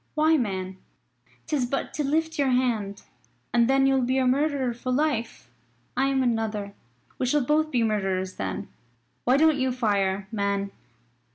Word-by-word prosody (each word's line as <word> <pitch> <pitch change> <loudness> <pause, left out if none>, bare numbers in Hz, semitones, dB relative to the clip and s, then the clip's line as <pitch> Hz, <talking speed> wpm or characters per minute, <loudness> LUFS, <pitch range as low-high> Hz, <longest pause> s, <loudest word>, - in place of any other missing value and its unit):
"Why, 310 +1 +4
man, 190 -7 -2 0.7
'tis 275 -5 0
but 275 +2 -3
to 300 - -1
lift 320 +2 0
your 275 -2 +3
hand. 230 -6 0 0.5
And 235 -1 +4
then 270 0 +4
you'll 270 -1 +3
be 255 +1 +1
a 260 - +2
murderer 270 -1 +1
for 240 +2 -4
life. 250 - -1 0.4
I 270 +1 +2
am 270 -1 +1
another 220 -4 -1 0.5
we 255 - 0
shall 285 0 +2
both 310 +3 +2
be 245 -5 +1
murderers 190 -4 -1
then. 95 -1 -4 0.6
Why 255 +2 +4
don't 310 -1 +4
you 260 0 +1
fire, 200 -5 0
man." 200 -2 -1
250 Hz, 160 wpm, -26 LUFS, 205-275 Hz, 0.7 s, Why